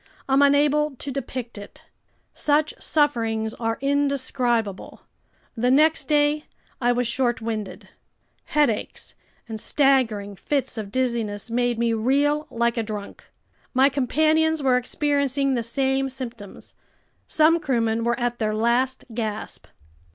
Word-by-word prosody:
I'm 270 +1 +3
unable 290 +1 +3
to 275 +2 -5
depict 255 -4 -5
it. 205 - -12 0.5
Such 300 +1 +1
sufferings 225 -7 +1
are 225 -1 -2
indescribable. 260 -7 -1 0.5
The 245 +1 +1
next 305 +5 +4
day 295 0 +2 0.4
I 245 0 +3
was 245 0 0
short 240 0 0
winded. 220 -3 -5 0.6
Headaches 290 -8 -1 0.3
and 220 -2 -6
staggering 235 -8 +1
fits 280 +7 -2
of 200 -2 -6
dizziness 230 -4 -2
made 245 0 +1
me 230 0 +1
reel 285 +6 +1
like 235 +1 0
a 230 - +1
drunk. 210 -2 -7 0.5
My 265 +2 +5
companions 310 +3 +1
were 260 -2 +4
experiencing 280 +1 0
the 240 - 0
same 265 +3 0
symptoms. 240 -6 -8 0.5
Some 320 +2 +4
crewmen 230 -6 0
were 235 +1 0
at 240 0 -1
their 215 -1 0
last 245 +4 +1
gasp. 215 -2 -4
250 Hz, 125 wpm, -23 LUFS, 230-285 Hz, 0.6 s, My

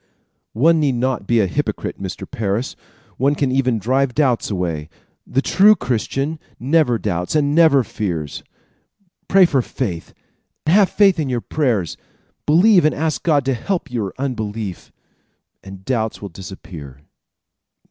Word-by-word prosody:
"One 160 +8 +4
need 140 -4 +1
not 120 -4 -1
be 120 -1 +3
a - - +2
hypocrite, 90 - -3
Mr. - - -5
Parris. 110 +3 -2 0.4
One 140 +3 +2
can 140 -3 0
even 130 -3 +1
drive 125 +4 0
doubts 130 -6 +1
away. 85 -6 -3 0.4
The 135 - 0
true 210 +3 +5
Christian 135 - -2 0.2
never 135 -1 +2
doubts 90 - -2
and 145 -1 +2
never 155 -5 +5
fears. 85 -11 -4 0.9
Pray 190 -1 +6
for 140 -6 +2
faith, 95 -9 -5 0.5
have 190 +5 +4
faith 195 -4 +3
in 145 -4 -1
your 125 -2 0
prayers, 115 - -1 0.5
believe 180 +5 +5
and 155 - +2
ask 155 0 -1
God 145 -5 +2
to 135 - +1
help 145 - -3
your 110 -6 -2
unbelief, 110 -7 -4 0.7
and 95 -1 -11
doubts 110 -4 -1
will 100 - -7
disappear." 80 -7 -10
125 Hz, 140 wpm, -20 LUFS, 100-150 Hz, 0.9 s, Pray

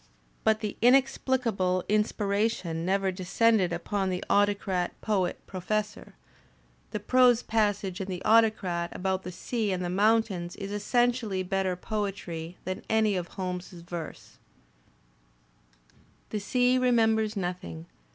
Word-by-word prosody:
But 220 0 +2
the 210 -2 -4
inexplicable 245 -7 +2
inspiration 205 -5 0
never 190 +1 +1
descended 185 +1 +2
upon 190 +3 -1
the 180 -1 -2
Autocrat 200 -3 +1
Poet 190 -5 0
Professor. 210 +3 -3 0.7
The - - -3
prose 250 -2 +4
passage 205 -3 0
in 190 - -4
"The 185 -1 -5
Au 225 +1 +7
tocrat" 180 -6 -2
about 190 0 -1
the 180 - -7
sea 220 +3 -2
and 180 -1 -2
the - - -2
moimtains 200 -3 +1
is 200 -1 -6
essentially 225 -1 +1
better 190 0 -1
poetry 185 -4 -4
than 185 +1 -3
any 220 -2 +3
of 180 -2 -2
Holmes's 180 -2 -6
verse: 170 -2 -8 1.9
"The 215 - -1
sea 250 +4 +2
remembers 225 -3 +2
nothing. 175 - -4
200 Hz, 120 wpm, -28 LUFS, 180-220 Hz, 1.9 s, Au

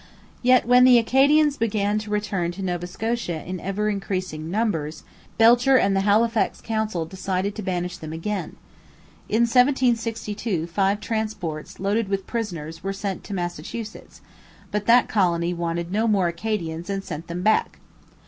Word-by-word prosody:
Yet, 255 0 +4
when 250 +1 +6
the 250 -1 +8
Acadians 280 +5 +4
began 210 -2 0
to 215 0 -8
return 200 -4 -1
to 195 +2 -6
Nova 175 -1 -2
Scotia 215 -4 -3
in 185 0 -5
ever 195 +4 -2
increasing 185 -6 -3
numbers, 170 -7 -2 0.3
Belcher 240 +4 +6
and 195 -4 +2
the 195 - +2
Halifax 220 +3 +2
Council 220 -6 -2
decided 190 +3 -2
to 215 - -6
banish 180 -2 -3
them 155 -1 -8
again. 195 +6 -4 0.7
In 220 +2 +2
1762 230 - +1
five 195 +4 0
transports 210 -9 -4
loaded 205 +3 0
with 195 -1 -2
prisoners 165 -9 -5
were 195 0 -2
sent 195 -1 -4
to 200 - -5
Massachusetts, 175 +5 -6 0.5
but 210 0 -2
that 240 +1 +6
colony 175 -4 +1
wanted 170 0 -3
no 220 +3 +1
more 200 -5 +2
Acadians 170 -2 -4
and 195 -1 -2
sent 160 0 -7
them 175 +1 -4
back. 215 +2 +2
200 Hz, 150 wpm, -23 LUFS, 175-225 Hz, 0.7 s, the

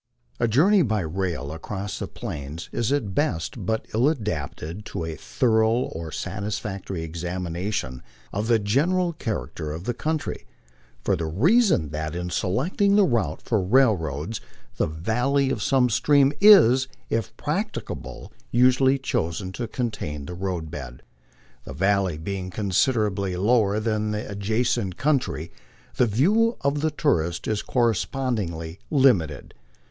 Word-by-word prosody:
A 120 - +2
journey 180 - +4
by 110 - +1
rail 85 -3 -3
across 95 +5 -5
the - - -3
Plains 70 +4 -7
is 115 +2 -1
at 120 -9 0
best 95 - -1
but 110 0 -1
ill 120 +6 +4
adapted 90 - -4
to 80 - -4
a 80 -1 -4
thorough 110 - +2
or 85 -9 -2
sat 95 +6 -4
isfactory 100 -4 -4
examination 85 -4 -3 0.3
of 105 +3 -2
the 115 -1 +4
general 165 - +1
character 95 - -4
of 80 +3 -6
the 120 - -1
country, 155 +5 -3 0.6
for 100 - +2
the 85 -2 -3
reason 150 - +3
that 80 +2 -4
in 90 0 -4
selecting 165 - +1
the 205 - +6
route 120 - 0
for 110 -4 +1
railroads 95 - +1 0.4
the - - +1
valley 125 - 0
of - - -2
some 130 -2 +3
stream 140 +4 +3
is, 130 - +7 0.2
if 115 +1 -2
practica 195 +9 -2
ble, - - -10 0.2
usually 130 +2 +4
chosen 95 -7 -2
to 120 +4 -4
contain 75 - -4
the 90 - -6
road 90 -3 -4
bed. 65 -5 -8 0.6
The - - -8
valley 95 +1 +1
being 95 +3 -4
considerably 100 -1 0
lower 105 +1 +2
than 110 -1 -1
the 105 +4 -3
adjacent 105 -1 -1
country, 130 - 0 0.5
the 125 - +4
view 205 - +3
of 140 +1 0
the 155 - +2
tourist 85 - 0
is 110 -1 0
correspondingly 110 -8 -1
lim 135 - +5
ited. 75 -3 -8
105 Hz, 140 wpm, -24 LUFS, 85-130 Hz, 0.6 s, is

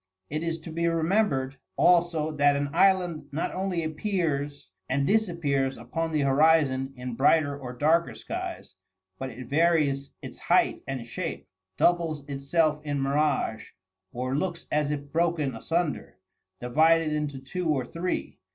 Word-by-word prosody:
It 155 +1 -2
is 165 0 -2
to 160 - -8
be 170 +1 0
remembered 165 -5 +1 0.2
also 170 -3 +3
that 145 -1 +3
an 140 0 -2
island 180 -4 +2
not 150 +4 -2
only 185 -3 -1
appears 155 -4 -2 0.2
and 140 +2 +1
disappears 155 -10 +1
upon 160 +8 -3
the 155 -2 +1
horizon 140 -1 +3
in 125 0 -5
brighter 145 +3 +3
or 130 -3 -7
darker 155 -3 +2
skies, 110 - -6 0.5
but 130 - -4
it 125 +1 -9
varies 145 -2 +2
its - - -8
height - - +2
and 130 -3 -4
shape, 165 +8 -5 0.3
doubles 165 -5 +1
itself 150 +2 0
in 145 -2 -2
mirage, 135 -5 0 0.4
or 130 +2 -2
looks 170 +2 -2
as 150 -1 +1
if 145 -1 -4
broken 165 -4 +1
asunder, 165 +7 -2 0.4
divided 155 +5 +3
into 150 -2 -2
two 165 +7 -4
or 135 -5 +1
three. 170 +7 -4
150 Hz, 140 wpm, -27 LUFS, 135-165 Hz, 0.5 s, also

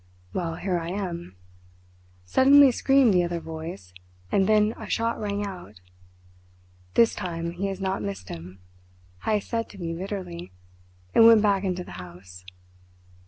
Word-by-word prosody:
"'Well, 165 -3 -2
here 180 0 -1
I 165 0 -5
am,' 175 - -5 0.9
suddenly 275 - +6
screamed 270 -2 +4
the 180 -1 +4
other 170 0 -2
voice, 160 - -8 0.4
and 195 -1 +3
then 215 0 +3
a - - -9
shot 230 0 0
rang 205 -1 -2
out. 180 - -9 1.2
"'This 230 -1 +5
time 170 -3 -4
he 185 +3 -3
has 195 -1 -4
not 190 0 -2
missed 200 - -6
him,' 90 +3 -9 0.6
Heyst 210 -2 0
said 230 0 -1
to 205 - -13
me 165 -2 -3
bitterly, 175 - -6 0.6
and 225 - +8
went 225 -2 +7
back 200 -2 +2
into 180 -2 -2
the - - -9
house. 90 +1 -13
185 Hz, 150 wpm, -25 LUFS, 165-210 Hz, 1.2 s, and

